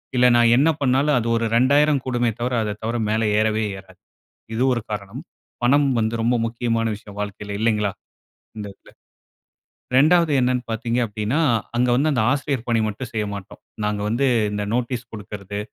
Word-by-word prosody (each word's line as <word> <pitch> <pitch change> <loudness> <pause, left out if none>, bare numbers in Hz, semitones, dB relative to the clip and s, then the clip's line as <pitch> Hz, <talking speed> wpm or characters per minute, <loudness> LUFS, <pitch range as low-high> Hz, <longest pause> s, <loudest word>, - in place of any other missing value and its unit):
இல்ல 125 - +4
நான் 115 -1 +5
என்ன 145 +5 +4
பண்ணாலும், 140 +2 +2
அது 115 - -3
ஒரு 115 - -1
2,000 140 +3 +4
கூடுமே 120 -2 0
தவிர, 125 +1 -1
அத 105 -1 -3
தவிர 115 +2 -1
மேல 110 +1 +1 0.2
ஏறவே 110 0 +1
ஏறாது. 95 -1 -15 0.6
இது 115 - -1
ஒரு 120 - -2
காரணம். 100 -2 -5 0.4
பணம் 140 +3 +4
வந்து 110 0 0
ரொம்ப 120 +2 +2
முக்கியமான 115 0 -1
விஷயம் 100 -1 -13
வாழ்க்கையில 105 0 -6
இல்லைங்களா? 105 -3 +1 0.7
இந்த 105 -1 -5
இதில. - - -20 1.1
2 160 +3 +4
என்னென்னு 125 0 0
பாத்தீங்க 115 +2 -1
அப்டின்னா, 105 +6 -2 0.4
அங்கே 125 0 +2
வந்து 150 +4 +2
அந்த 120 - +1
ஆசிரியர் 135 -3 -2
பணி 115 -1 +2
மட்டும் 110 +5 -6
செய்ய 110 -1 -1
மாட்டோம். 100 -2 -10 0.2
நாங்க 105 -1 -1
வந்து 120 +6 +1 0.3
இந்த 105 0 -2
நோட்டீஸ் 125 0 -2
குடுக்கிறது 100 -1 -7
115 Hz, 165 wpm, -22 LUFS, 105-125 Hz, 1.1 s, நான்